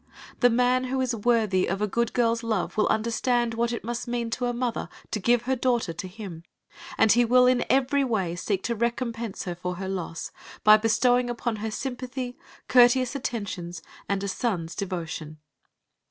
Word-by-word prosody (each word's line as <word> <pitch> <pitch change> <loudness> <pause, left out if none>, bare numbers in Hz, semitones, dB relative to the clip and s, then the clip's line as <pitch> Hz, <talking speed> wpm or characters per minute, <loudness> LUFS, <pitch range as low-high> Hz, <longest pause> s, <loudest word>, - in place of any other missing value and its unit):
The 245 - +6
man 250 +2 +2
who 260 +1 -2
is 255 -2 0
worthy 215 -4 +2
of 195 +2 -1
a 210 - +1
good 235 +3 0
girl's 230 -1 +2
love 220 -5 -2
will 210 - +2
understand 235 +2 +1
what 235 +1 0
it 235 - -4
must 240 +2 -4
mean 235 -1 -2
to 245 +1 -1
a - - 0
mother 240 -1 -2 0.2
to 215 - -1
give 235 +4 +2
her 260 +2 0
daughter 240 -8 0
to 185 +3 -6
him, 185 -4 -8 0.6
and 220 - +5
he 240 +3 +5
will 250 +2 +5
in 250 -1 +3
every 275 +2 +3
way 195 -9 -1
seek 190 +2 -2
to 235 - 0
recompense 235 -1 -2
her 180 - -3
for 180 +1 -4
her 190 +1 -5
loss, 180 -3 -4 0.3
by 215 0 +9
bestowing 245 +3 +2
upon 235 -1 -2
her 220 +1 -3
sympathy, 250 +1 -5 0.3
courteous 250 +1 +5
attentions, 200 - -4 0.3
and 200 0 0
a - - -2
son's 185 -5 -2
devotion. 165 -5 -5
230 Hz, 185 wpm, -26 LUFS, 195-245 Hz, 0.6 s, by